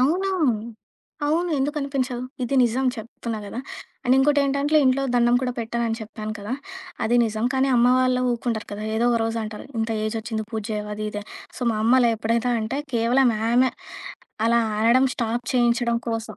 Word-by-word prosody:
అవును. 355 +9 +2 1.0
అవును. 335 +4 +1
ఎందుకనిపించదు? 270 -3 -2 0.2
ఇది 245 +2 -1
నిజం 245 +3 +1
చెప్తున్నా 225 0 -6
గదా! 230 +5 -5 0.4
అండ్ 250 0 +4
ఇంకోటేంటంటే 285 +1 +2
ఇంట్లో 260 +1 +3
దండం 240 0 +4
కూడా 250 -1 -1
పెట్టనని 230 0 -1
చెప్పాను 215 0 -6
కదా! 205 +3 -5 0.5
అది 235 +2 +2
నిజం 220 0 -2
కానీ 265 +1 +2
అమ్మ 240 +1 +5
వాళ్ళు 255 0 +2
ఊరుకుండరు 235 -2 -2
కదా. 205 +1 -5
ఏదో 230 +2 +2
ఒక 235 - +2
రోజు 225 0 -2
అంటారు 215 0 -8
ఇంత 225 +1 -1 0.2
ఏజొచ్చింది 220 0 -3
పూజెయవు 210 -1 -3
అది 215 0 -5
ఇది 205 - -5
అని. - - -19 0.3
సో, - - -13
మా - - -2
అమ్మలా 240 0 +5
ఎప్పుడైతే 230 +2 0
అంటే 245 +6 -3 0.2
కేవలం 240 +3 +3 0.2
ఆమె 250 +2 +4 0.8
అలా 235 0 +4 0.2
అనడం 240 +4 +5
స్టాప్ 235 +1 -2
చేయించడం 235 -1 +2
కోసం. 225 0 -4
235 Hz, 160 wpm, -23 LUFS, 225-260 Hz, 1.0 s, అమ్మ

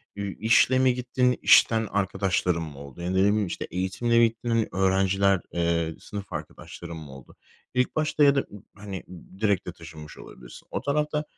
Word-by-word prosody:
i 100 0 -4
işle 115 +3 +4
mi 130 -1 +4
gittin, 125 0 0
işten 110 -1 +5
arkadaşların 95 -3 0
mı 75 -4 -9
oldu? 70 +3 -11
Ya 85 - -4
da - - -1
ne 95 - -2
bileyim, 100 +2 +3
işte, 90 - -5
eğitimle 95 +6 0
mi 120 - +6
gittin 115 0 -1
öğrenciler, 95 0 +2
eee, 85 -1 0
sınıf 100 -2 -8
arkadaşların 80 +2 -8
mı 75 -3 -10
oldu? 65 -1 -14 0.4
İlk 125 0 0
başta 155 -1 +1
ya 140 -1 +6
da - - +3
m 105 - -11 0.2
hani, 100 -2 -7 0.4
direkt 100 -4 +1
de - - -3
taşınmış 80 -3 -12
olabilirsin. - - -13
O - - -3
tarafta 150 +1 -1
100 Hz, 180 wpm, -26 LUFS, 85-115 Hz, 0.4 s, mi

